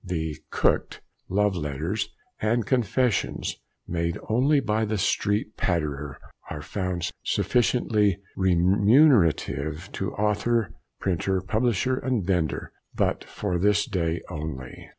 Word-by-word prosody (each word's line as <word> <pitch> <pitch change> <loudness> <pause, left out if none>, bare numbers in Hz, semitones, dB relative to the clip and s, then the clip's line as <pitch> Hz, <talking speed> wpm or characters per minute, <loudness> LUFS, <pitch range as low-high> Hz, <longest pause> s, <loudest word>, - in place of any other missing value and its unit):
"The 80 -5 -3
(cooked) - - +1 0.3
Love 105 +1 +2
Letters" 80 +6 -2 0.3
and 110 +1 +1
"Confessions" 125 0 0 0.3
made 85 0 -1
only 135 +6 +4
by 110 -3 0
the 110 0 -1
Street 105 +2 0
Patterer, 75 -5 -1 0.3
and 80 - -4
are - - -6
found 90 -4 -2
sufficiently 110 -5 +2 0.2
remunerative 95 - +3
to 95 - -2
author, 105 -2 +1 0.3
printer, 95 +1 0
publisher, 115 +5 +1
and 125 -8 -1
vendor 85 -6 -1 0.2
But - - 0
for 90 -4 -2
THIS 105 +4 +3
DAY 85 -8 -1
ONLY! 75 -5 -7
95 Hz, 110 wpm, -26 LUFS, 85-110 Hz, 0.3 s, only